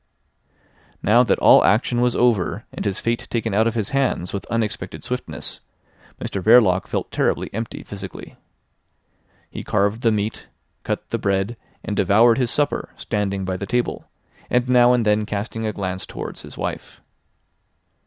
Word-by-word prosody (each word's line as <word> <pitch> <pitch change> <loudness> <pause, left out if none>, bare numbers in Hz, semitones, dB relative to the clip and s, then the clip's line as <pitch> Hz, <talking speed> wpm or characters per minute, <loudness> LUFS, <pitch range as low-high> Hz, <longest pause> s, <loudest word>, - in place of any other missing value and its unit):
Now 115 +4 +5
that 115 -5 +2
all - - +7
action 120 +3 +2
was 125 0 +2
over 110 -4 +1
and - - -5
his 100 -2 0
fate 115 0 -2
taken 115 -3 -1
out 110 +3 +3
of 115 - -1
his 110 -4 -1
hands 135 -10 0
with 100 - -4
unexpected 115 -2 -3
swiftness, - - -5 0.6
Mr 100 - -4
Verloc 105 -3 +5
felt - - -3
terribly - - 0
empty 115 +1 -5
physically. 100 -2 -9 1.2
He - - -6
carved 105 +2 0
the 115 - +3
meat, 105 +1 -2 0.4
cut - - -3
the - - -1
bread, 100 +3 0 0.3
and 105 - -3
devoured 110 +5 +4
his 125 -2 +1
supper 145 +3 0
standing 100 -3 -2
by 95 0 -2
the 100 - -5
table, 120 +4 -2 0.4
and 125 0 +1
now 125 -1 +5
and 120 -2 +2
then 105 0 +3
casting 110 +2 -3
a - - 0
glance 95 -2 -4
towards - - -7
his - - -11
wife. - - -5
110 Hz, 160 wpm, -22 LUFS, 100-120 Hz, 1.2 s, all